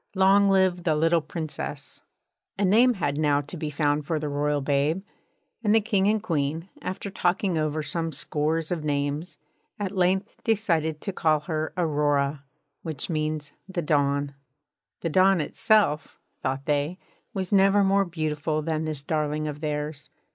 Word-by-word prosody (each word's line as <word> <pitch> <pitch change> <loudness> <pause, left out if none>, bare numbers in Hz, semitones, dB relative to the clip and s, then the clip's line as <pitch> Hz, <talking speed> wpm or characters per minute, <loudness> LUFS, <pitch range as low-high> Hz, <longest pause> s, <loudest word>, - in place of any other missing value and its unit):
Long 195 +1 +5
live 190 -2 +3
the 160 -3 +1
little 165 +2 +3
Princess!' 155 0 -6 0.6
A 200 - +2
name 235 +6 +5
had 145 -6 -1
now 145 -2 +3
to 145 +5 -10
be 155 -2 -3
found 145 -1 0
for 160 - 0
the 150 -1 -3
royal 145 +1 0
babe; 145 +6 0 0.6
and 210 0 +4
the - - +7
King 200 -3 +1
and 215 0 +2
Queen, 160 -2 -1
after 195 +1 -5
talking 180 0 0
over 155 0 -1
some 165 +1 -2
scores 155 +2 -1
of 170 -3 -2
names, 145 +2 -2 0.4
at 200 -2 -3
length 190 +2 0
decided 165 -9 +1
to 195 - -4
call 155 -3 +2
her 155 +1 -2
Aurora, 145 -3 +1 0.4
which 160 +1 -3
means 155 -2 -2 0.2
The 180 -2 -2
Dawn. 140 -1 +1 0.7
The 165 - -1
Dawn 190 +2 +4
itself 155 -1 +1 0.2
(thought 135 +1 -2
they) 150 +4 0 0.4
was 190 -2 -3
never 195 0 +5
more 195 +1 +3
beautiful 155 -3 -2
than 160 0 -1
this 155 -3 -4
darling 155 0 -1
of 150 -1 -5
theirs. 150 -1 -3
155 Hz, 155 wpm, -26 LUFS, 150-185 Hz, 0.7 s, the